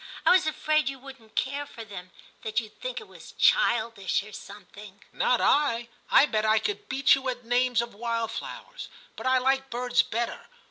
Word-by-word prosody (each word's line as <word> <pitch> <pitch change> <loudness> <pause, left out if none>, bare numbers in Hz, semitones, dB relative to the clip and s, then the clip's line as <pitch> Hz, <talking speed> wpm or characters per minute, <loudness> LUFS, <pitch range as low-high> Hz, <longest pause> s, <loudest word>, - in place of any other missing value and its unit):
I - - +6
was 365 -3 +5
afraid 310 -2 +1
you 270 - -6
wouldn't 260 -4 -14
care 280 +2 -1
for 230 - -9
them; 185 -3 -9 0.3
that 220 +1 0
you'd 215 -3 -11
think - - -4
it 440 - -13
was - - -14
childish 230 - +2
or 215 - -12
something.' 200 0 -12
* - - -36
Not 250 - +2
I. 240 -5 +2 0.2
I - - +7
bet 215 -6 -1
I 220 0 +4
could 415 - -3
beat 270 0 +4
you 265 -1 0
at 245 -1 -5
the - - -21
names 245 -1 +2
of 235 - -9
wildflowers; 230 - -5 0.3
but - - -5
I 260 0 +4
like 265 +1 +1
birds 245 +1 +2
better. 235 +1 -4
245 Hz, 195 wpm, -27 LUFS, 220-270 Hz, 0.3 s, I